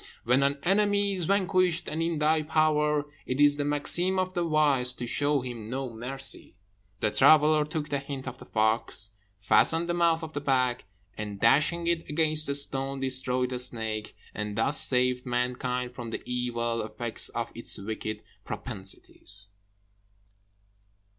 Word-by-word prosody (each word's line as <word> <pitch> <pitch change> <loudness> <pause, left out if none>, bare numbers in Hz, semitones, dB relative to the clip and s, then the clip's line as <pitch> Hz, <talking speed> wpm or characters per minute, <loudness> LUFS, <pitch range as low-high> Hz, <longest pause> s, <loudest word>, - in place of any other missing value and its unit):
When 125 +3 +3
an 140 +1 +1
enemy 205 +1 +2
is 180 -3 -3
vanquished, 185 -2 +1
and 155 +2 -3
in 165 -1 -1
thy 155 +1 +2
power, 150 -1 +2 0.2
It 130 +2 -2
is 145 0 +5
the 145 - -1
maxim 170 +6 +1
of 185 0 -1
the 175 -2 0
wise 145 -6 +2
to 125 - -6
show 145 +3 +1
him 120 -4 -7
no 130 0 -3
mercy." 135 0 -5 0.5
The 105 - +1
traveller 150 +3 +5
took 150 0 -4
the 140 - -1
hint 135 -1 -7
of 130 - -7
the - - -12
fox, 110 -1 -1 0.3
fastened 160 +11 +3
the 175 - 0
mouth 170 -1 +2
of 160 -1 -7
the 145 - -3
bag, 130 -4 0 0.3
and, 105 -2 -6
dashing 155 - +3
it 170 -1 -1
against 155 0 +3
a 140 - +2
stone, 135 -1 0
destroyed 130 -1 0
the 125 - -2
snake, 110 -3 -2 0.2
and 105 0 -4
thus 140 +6 +3
saved 125 0 +1
mankind 125 0 -2
from 120 -2 -7
the - - -5
evil 120 -2 -2
effects 115 +1 -3
of 115 0 -4
its 115 - -3
wicked 110 +1 -5 0.2
propensities. 100 +1 -4
135 Hz, 160 wpm, -28 LUFS, 120-155 Hz, 0.5 s, is